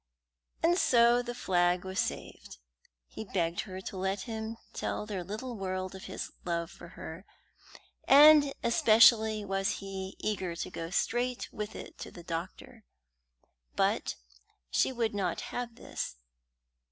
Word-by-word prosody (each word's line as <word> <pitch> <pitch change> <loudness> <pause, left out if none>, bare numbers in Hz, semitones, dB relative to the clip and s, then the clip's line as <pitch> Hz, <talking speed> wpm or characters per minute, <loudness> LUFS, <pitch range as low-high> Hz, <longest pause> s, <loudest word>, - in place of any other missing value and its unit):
And 345 +2 +4
so 240 0 +5
the 240 0 -6
flag 175 -3 +1
was 190 +1 -3
saved. - - -4 0.5
He 140 - -8
begged 175 -4 -1
her 185 0 -6
to 190 - -7
let 190 +1 -1
him 220 0 -5 0.2
tell - - -3
their 200 -4 -4
little 220 +7 -5
world 185 -2 -3
of 190 - -9
his - - -5
love 170 -1 -2
for 170 - -12
her, 160 +4 -8 0.8
and 290 0 +8
especially 220 -2 +5
was 195 0 0
he 195 -1 -6
eager 190 -5 -2
to - - -5
go 165 0 -5
straight 245 +6 -1
with 210 -1 -5
it - - -9
to - - -6
the 175 - -12
doctor. 175 +7 -6 0.9
But - - +1 0.6
she - - +2
would 235 -4 -1
not 190 -4 -1
have 245 -1 -4
this. - - -5
200 Hz, 140 wpm, -30 LUFS, 185-235 Hz, 0.9 s, and